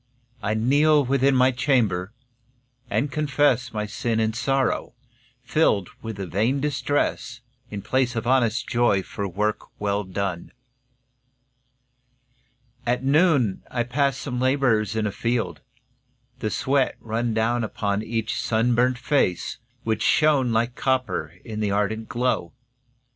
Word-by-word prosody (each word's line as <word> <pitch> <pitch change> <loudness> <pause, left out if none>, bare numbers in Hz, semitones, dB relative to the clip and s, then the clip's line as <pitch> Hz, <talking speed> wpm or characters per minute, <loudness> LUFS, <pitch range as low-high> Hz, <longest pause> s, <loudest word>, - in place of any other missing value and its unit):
I 110 +1 -1
kneel 145 +6 +4
within 135 +1 +2
my 130 +1 +5
chamber, 115 -8 +1 0.8
and 140 +3 0
confess 145 -3 +1
My 105 -1 -2
sin 110 +2 -2
and 110 0 0
sorrow, 135 +1 0 0.5
filled 120 - +2
with 110 -2 -6
vain 105 +8 0
distress, 135 -3 -1 0.3
In 100 -2 -6
place 125 +1 0
of 115 - -2
honest 120 -3 +2
joy 120 -6 +2
for 100 +1 -4
work 105 +4 -2
well 100 0 0
done. 95 -2 -4 2.3
At 125 +1 0
noon 140 - +3
I 120 -1 -1
passed 135 +2 0
some 125 -3 -3
labourers 125 -6 +2
in 110 -1 0
a 105 - -1
field. 115 +3 -2 0.8
The 110 - -1
sweat 135 +3 +1
ran 115 0 -2
down 120 +2 +1
upon 100 -1 -1
each 110 0 -2
sunburnt 120 +2 +2
face, 125 - 0 0.2
Which 110 -1 -1
shone 145 -5 +3
like 115 +2 +1
copper 130 -1 -1
in 110 -3 -5
the 105 -1 0
ardent 105 +2 -1
glow. 120 -8 -1
120 Hz, 125 wpm, -24 LUFS, 110-130 Hz, 2.3 s, my